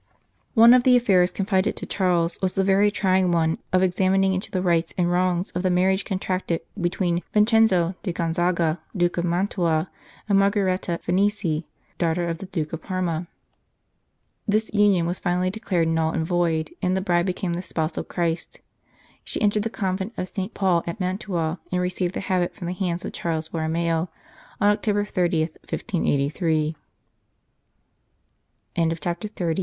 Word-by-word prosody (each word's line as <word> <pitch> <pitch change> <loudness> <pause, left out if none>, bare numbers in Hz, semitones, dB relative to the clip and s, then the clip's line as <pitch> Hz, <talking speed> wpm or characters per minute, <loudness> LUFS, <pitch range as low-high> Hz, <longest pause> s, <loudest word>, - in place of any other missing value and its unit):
One 230 +1 +8
of 250 - +6
the 250 0 +5
affairs 190 -7 +3
confided 190 -1 0
to - - -6
Charles 175 -3 0
was 185 -1 0
the 195 - +2
very 195 +2 +4
trying 190 -3 +2
one 160 -1 +1
of 185 0 +3
examining 190 +1 +2
into 185 +1 -3
the 185 -1 -2
rights 170 -2 +1
and 175 -1 +1
wrongs 180 0 +1
of 180 - -2
the 185 - +1
marriage 190 +2 +2
contracted 185 -3 -2
between 175 0 0
Vin 210 0 +6
cenzo 210 -6 +3
di 185 - -2
Gonzaga, 170 0 0 0.2
Duke 175 0 +1
of 175 - 0
Mantua, 175 -2 0 0.4
and 200 -2 +4
Mar 195 0 +5
geretta 185 -4 -1
Farnese, 180 -4 0 0.3
daughter 170 0 0
of 165 -1 -3
the 195 - -7
Duke 160 -5 -3
of 165 - -4
Parma. 175 -2 -2 1.2
This 215 +1 +1
union 205 -5 +4
was 175 +2 -2
finally 180 0 0
declared 190 -6 -1
null 160 -1 +1
and 160 0 -1
void, 165 -2 0
and 185 +1 +1
the - - 0
bride 175 -1 +1
became 185 -1 -2
the 175 - -2
spouse 160 -3 -3
of - - -4
Christ. 170 -1 -2 0.6
She - - -5
entered 210 0 +2
the 225 - -2
Convent 190 0 -3
of 180 - -3
St. 195 +1 -5
Paul 180 -4 +2
at 170 +6 -4
Mantua, 180 -3 -2
and 180 - 0
received 180 0 -1
the - - -2
habit 185 -3 -1
from 175 - -7
the 175 - -2
hands 180 -2 -2
of - - -5
Charles 160 -1 -3
Borromeo 165 +1 -1 0.5
on 205 0 +5
October 205 0 0
30, 175 -5 +1
1583. 155 -1 -1 2.0
209 165 -1 +1
CHAPTER 175 +5 -3
XXX 170 -4 -2
180 Hz, 170 wpm, -24 LUFS, 170-195 Hz, 2.0 s, One